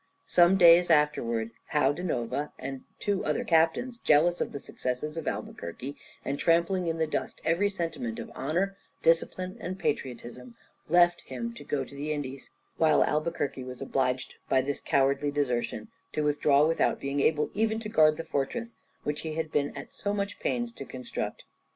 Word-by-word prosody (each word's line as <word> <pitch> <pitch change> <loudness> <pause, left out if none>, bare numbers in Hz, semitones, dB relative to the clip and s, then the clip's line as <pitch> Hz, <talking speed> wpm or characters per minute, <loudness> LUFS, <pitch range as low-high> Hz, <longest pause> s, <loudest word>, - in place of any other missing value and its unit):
Some 175 +2 +5
days 175 -1 +7
afterwards 120 -8 +2 0.2
Joao 145 -2 +3
da 175 - -6
Nova 145 -3 -2
and 135 -1 -6
two 200 -2 0
other 150 - 0
captains, 165 +10 +2
jealous 170 +2 +4
of - - -1
the 140 - -5
successes 130 +4 -4
of 165 - -5
Albuquerque, 125 +12 -5 0.3
and 140 +1 -2
trampling 170 +2 +2
in 165 0 -1
the 160 - +2
dust 155 - -3
every 175 +5 +2
sentiment 165 - -3
of - - -7
honour, 180 +8 -1 0.3
discipline, 185 +3 +1
and 185 +2 -4
patriotism, 125 -5 -4 0.3
left 175 +1 +5
him 235 0 -4
to 235 - -10
go 140 -2 -1
to - - -15
the 145 +2 -4
Indies; 140 -3 -5 0.3
while 155 -2 +5
Albuquerque 150 -4 -1
was 125 0 -8
obliged 130 -1 -1 0.2
by 130 - +4
this 140 +2 -1
cowardly 140 +1 +2
desertion 125 -6 -1 0.2
to 150 - 0
withdraw 145 0 +4
without 165 +1 +2
being 140 +1 -2
able 150 +1 +2
even 220 +2 +1
to 220 - -5
guard 155 -6 +4
the 165 - -4
fortress 230 - -2 0.3
which 150 0 -2
he 160 -1 -4
had 160 -1 -2
been 145 -1 +1
at - - -8
so 205 0 -2
much 200 0 -3
pains 240 -1 -1
to 230 - -8
construct. 130 -2 -5
150 Hz, 175 wpm, -28 LUFS, 135-175 Hz, 0.3 s, days